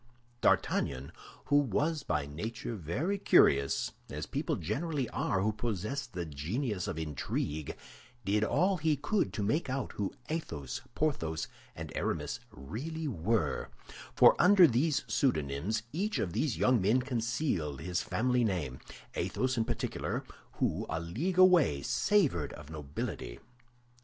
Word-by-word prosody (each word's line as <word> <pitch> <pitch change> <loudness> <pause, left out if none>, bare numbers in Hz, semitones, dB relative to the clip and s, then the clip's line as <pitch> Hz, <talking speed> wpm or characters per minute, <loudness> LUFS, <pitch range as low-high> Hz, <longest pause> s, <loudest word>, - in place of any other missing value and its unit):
D'Artagnan, 65 +2 +1 0.3
who 145 - +4
was 145 - +1
by 75 - -1
nature 110 +12 -5
very 130 - -2
curious—as 70 - +2
people - - -1
generally 145 - -2
are 95 - 0
who 110 - +2
possess 115 +5 -3
the 90 -8 -5
genius 90 - -2
of - - -3
intrigue—did 80 - -3
all 185 - +2
he 155 -2 +2
could 150 - 0
to 105 - -2
make 140 +9 0
out 130 0 -2
who 100 -2 -2 0.2
Athos, 80 - -4
Porthos, 80 - -1 0.3
and - - -6
Aramis - - -2
really 150 - -5
were 110 - 0 0.5
(for - - +8
under 185 0 +8
these 145 +2 +2
pseudonyms 90 - 0
each 205 +7 -1
of 85 - -1
these 150 +4 0
young 130 -4 +3
men 115 +7 +3
concealed 115 - -1
his 90 +1 -1
family 125 +1 +1
name)—Athos 95 - -2
in 115 -2 +1
particular, 120 -1 -2 0.3
who, - - -1
a 80 - -1
league 130 - -2
away, 175 - +6
savored 150 - +2
of 75 +1 -11
nobility. 70 -5 -5
110 Hz, 125 wpm, -31 LUFS, -, 0.5 s, for